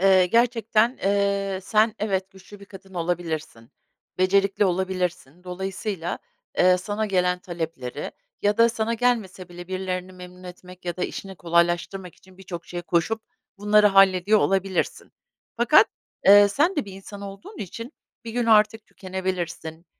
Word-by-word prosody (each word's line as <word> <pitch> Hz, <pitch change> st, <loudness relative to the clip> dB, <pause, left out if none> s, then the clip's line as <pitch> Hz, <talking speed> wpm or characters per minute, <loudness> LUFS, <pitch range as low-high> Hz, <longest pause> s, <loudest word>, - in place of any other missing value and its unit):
Iıı, 190 Hz, -1 st, +5 dB
gerçekten, 230 Hz, +2 st, +2 dB
ııı, 200 Hz, -1 st, +1 dB
sen 215 Hz, +2 st, +2 dB
evet 195 Hz, -2 st, -1 dB
güçlü 195 Hz, +1 st, -15 dB
bir -, -, -11 dB
kadın 195 Hz, -1 st, -14 dB
olabilirsin, 165 Hz, -8 st, -4 dB, 0.5 s
becerikli 195 Hz, +2 st, +3 dB
olabilirsin, 180 Hz, -4 st, -2 dB
dolayısıyla, 190 Hz, 0 st, -4 dB, 0.4 s
eee, 180 Hz, 0 st, +5 dB
sana 205 Hz, +4 st, -3 dB
gelen 180 Hz, -2 st, +1 dB
talepleri 160 Hz, -7 st, -5 dB, 0.3 s
ya 205 Hz, 0 st, +2 dB
da 230 Hz, 0 st, +6 dB
sana 230 Hz, 0 st, -1 dB
gelmese 220 Hz, -7 st, -1 dB
bile 175 Hz, +1 st, -10 dB
birilerini 185 Hz, 0 st, -4 dB
memnun 180 Hz, 0 st, -12 dB
etmek 180 Hz, 0 st, -12 dB
ya 175 Hz, -1 st, -3 dB
da 180 Hz, -, -1 dB
işini 190 Hz, -2 st, -7 dB
kolaylaştırmak 175 Hz, +2 st, 0 dB
için 185 Hz, 0 st, -21 dB
birçok 180 Hz, -3 st, -8 dB
şeye 175 Hz, 0 st, -6 dB
koşup 175 Hz, +7 st, 0 dB, 0.4 s
bunları 210 Hz, +1 st, +4 dB
hallediyor 195 Hz, +1 st, +5 dB
olabilirsin. 195 Hz, -1 st, -1 dB, 0.4 s
Fakat, 240 Hz, +6 st, +6 dB, 0.4 s
ııı, 205 Hz, 0 st, +9 dB
sen 305 Hz, -, +1 dB
de 295 Hz, -, 0 dB
bir 195 Hz, -, -10 dB
insan 195 Hz, +1 st, -10 dB
olduğun 200 Hz, -, -10 dB
için 230 Hz, -, -7 dB, 0.3 s
bir 230 Hz, -, -6 dB
gün 240 Hz, 0 st, -1 dB
artık 215 Hz, 0 st, +4 dB
tükenebilirsin, 180 Hz, -3 st, -5 dB
190 Hz, 140 wpm, -24 LUFS, 180-210 Hz, 0.5 s, ııı